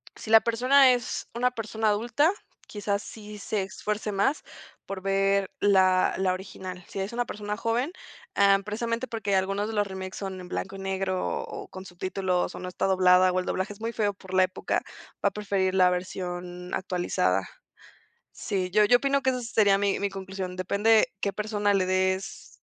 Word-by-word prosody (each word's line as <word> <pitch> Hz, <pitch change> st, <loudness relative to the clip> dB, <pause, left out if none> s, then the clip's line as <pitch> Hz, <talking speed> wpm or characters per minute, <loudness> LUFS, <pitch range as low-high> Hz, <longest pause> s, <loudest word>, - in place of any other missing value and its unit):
Si -, -, -9 dB
la 225 Hz, 0 st, +8 dB
persona, 255 Hz, +3 st, +5 dB
es 245 Hz, -2 st, -3 dB
una 250 Hz, +2 st, +1 dB
persona 220 Hz, -2 st, -1 dB
adulta, 240 Hz, -, +2 dB, 0.4 s
quizás, 205 Hz, -1 st, -2 dB
sí 210 Hz, -1 st, -10 dB
se 205 Hz, 0 st, -2 dB
esfuerce 210 Hz, +2 st, -3 dB
más, 200 Hz, +10 st, +1 dB, 0.4 s
por 195 Hz, -1 st, -6 dB
ver 195 Hz, 0 st, +1 dB
la 185 Hz, -2 st, +4 dB
la 190 Hz, -1 st, +1 dB
original. 185 Hz, -1 st, -7 dB
Si 195 Hz, -, -6 dB
es 195 Hz, +4 st, -3 dB
una 245 Hz, +1 st, 0 dB
persona 210 Hz, -1 st, -5 dB
joven, 235 Hz, +7 st, 0 dB, 0.4 s
eh, 200 Hz, 0 st, +5 dB
precisamente, 230 Hz, +4 st, -2 dB
porque 210 Hz, -4 st, -1 dB
algunos 195 Hz, +2 st, 0 dB
de 225 Hz, -, -5 dB
los 205 Hz, -1 st, +1 dB
remakes 190 Hz, -1 st, -6 dB
son 190 Hz, -2 st, -5 dB
en 180 Hz, -1 st, -10 dB
blanco 195 Hz, +1 st, -4 dB
y -, -, -8 dB
negro, 190 Hz, -1 st, -2 dB
o -, -, -8 dB
con 190 Hz, 0 st, -10 dB
subtítulos, 185 Hz, 0 st, -2 dB
o -, -, -7 dB
no 180 Hz, -, -6 dB
está 180 Hz, -, -2 dB
doblada, 185 Hz, -1 st, +5 dB
o 185 Hz, -, +1 dB
el 180 Hz, -, -3 dB
doblaje 190 Hz, +3 st, -2 dB
es 205 Hz, -, -18 dB
muy 230 Hz, +1 st, -2 dB
feo, 210 Hz, -3 st, 0 dB
por 190 Hz, -1 st, -12 dB
la 185 Hz, -, +6 dB
época. 185 Hz, 0 st, -1 dB, 0.4 s
Va -, -, +4 dB
a -, -, -24 dB
preferir 195 Hz, -3 st, -1 dB
la 185 Hz, -1 st, +5 dB
versión 180 Hz, 0 st, -5 dB
actualizada. 95 Hz, -, 0 dB, 0.8 s
Sí. 185 Hz, -2 st, -2 dB
Yo 210 Hz, +1 st, +5 dB
yo 245 Hz, +3 st, +6 dB
opino, 275 Hz, +1 st, +1 dB
que 260 Hz, -, +2 dB
esa 250 Hz, -1 st, -1 dB
sería 210 Hz, -4 st, +3 dB
mi 200 Hz, 0 st, 0 dB
mi 200 Hz, 0 st, 0 dB
conclusión. 190 Hz, -1 st, -6 dB
Depende, 205 Hz, +4 st, +3 dB
qué 200 Hz, -, 0 dB
persona 205 Hz, -1 st, 0 dB
le 190 Hz, -2 st, +2 dB
des, 185 Hz, 0 st, -1 dB
195 Hz, 185 wpm, -27 LUFS, 185-215 Hz, 0.8 s, la